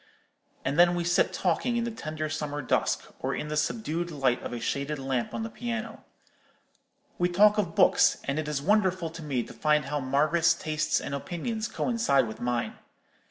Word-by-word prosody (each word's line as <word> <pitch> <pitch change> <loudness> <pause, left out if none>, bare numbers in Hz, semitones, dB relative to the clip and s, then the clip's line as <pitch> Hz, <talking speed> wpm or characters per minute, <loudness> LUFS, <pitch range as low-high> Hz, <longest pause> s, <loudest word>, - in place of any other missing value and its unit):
And 140 +5 0
then 175 0 +6
we 175 - -1
sit 175 +1 +2
talking 195 +7 0
in 235 - 0
the 235 - -2
tender 155 -7 -4
summer 145 -2 -3
dusk, - - 0
or - - -2
in 150 - -4
the 150 - -2
subdued 170 +1 -1
light 135 -6 0
of - - -6
a 120 - -4
shaded 140 +5 -2
lamp 135 -3 -2
on 225 - -3
the 225 - -4
piano. 230 -2 -5 1.2
We 175 0 +2
talk 210 +4 +5
of 175 -5 -1
books; - - +5
and 140 +2 -1
it 155 - -3
is 145 -2 -2
wonderful 185 -3 +2
to 165 0 -9
me 135 -6 -1
to - - -11
find 150 -2 +2
how 145 +1 -2
Margaret's 155 +5 +2
tastes 155 -2 0
and 140 - -5
opinions 215 - -3
coincide 225 - +1
with 110 - -8
mine. 120 -1 -2
155 Hz, 190 wpm, -28 LUFS, 140-185 Hz, 1.2 s, then